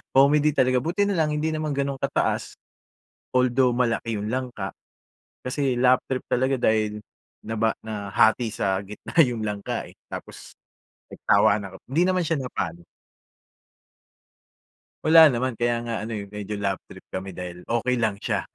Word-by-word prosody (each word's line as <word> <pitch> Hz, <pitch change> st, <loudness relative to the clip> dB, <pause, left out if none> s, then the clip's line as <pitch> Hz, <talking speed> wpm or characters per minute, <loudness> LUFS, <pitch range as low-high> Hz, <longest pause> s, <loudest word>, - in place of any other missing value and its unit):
comedy 145 Hz, +3 st, +5 dB
talaga, 130 Hz, 0 st, +3 dB
buti 175 Hz, +7 st, 0 dB
na 200 Hz, -, 0 dB
lang 155 Hz, -1 st, +1 dB
hindi 155 Hz, +1 st, 0 dB
naman 155 Hz, -1 st, -2 dB
ganun 140 Hz, 0 st, -1 dB
kataas. -, -, -1 dB, 0.8 s
Although 125 Hz, 0 st, +3 dB
malaki 115 Hz, -2 st, 0 dB
yung 105 Hz, +2 st, -3 dB
langka, 125 Hz, -6 st, -3 dB, 0.7 s
kasi 130 Hz, +1 st, 0 dB
laugh 125 Hz, 0 st, +5 dB
trip 130 Hz, -1 st, -1 dB
talaga 130 Hz, +2 st, +2 dB
dahil 110 Hz, -2 st, +1 dB, 0.4 s
naba 110 Hz, 0 st, 0 dB
nahati 110 Hz, +2 st, +1 dB
sa 95 Hz, -3 st, 0 dB
gitna 105 Hz, +1 st, -10 dB
yung 120 Hz, -5 st, -2 dB
langka, 105 Hz, -1 st, -3 dB
eh, -, -, -16 dB, 0.2 s
tapos -, -, -9 dB, 0.6 s
nagtawanan 100 Hz, -2 st, +2 dB
kami. -, -, -60 dB
Hindi 155 Hz, +6 st, +2 dB
naman 185 Hz, -1 st, +2 dB
siya 165 Hz, -1 st, 0 dB
napano. 85 Hz, -9 st, -4 dB, 2.2 s
Wala 160 Hz, -1 st, +8 dB
naman, 125 Hz, 0 st, -1 dB
kaya 120 Hz, 0 st, 0 dB
nga 120 Hz, -1 st, -4 dB
ano 110 Hz, -, -5 dB
yung 105 Hz, -2 st, -4 dB
medyo 105 Hz, 0 st, -6 dB
laugh 100 Hz, -2 st, -1 dB
trip -, -, -14 dB
kami 95 Hz, +1 st, -5 dB
dahil 90 Hz, -1 st, -8 dB
okey 120 Hz, +2 st, 0 dB
lang 110 Hz, -4 st, 0 dB
siya. -, -, -1 dB
120 Hz, 150 wpm, -24 LUFS, 105-135 Hz, 2.2 s, Wala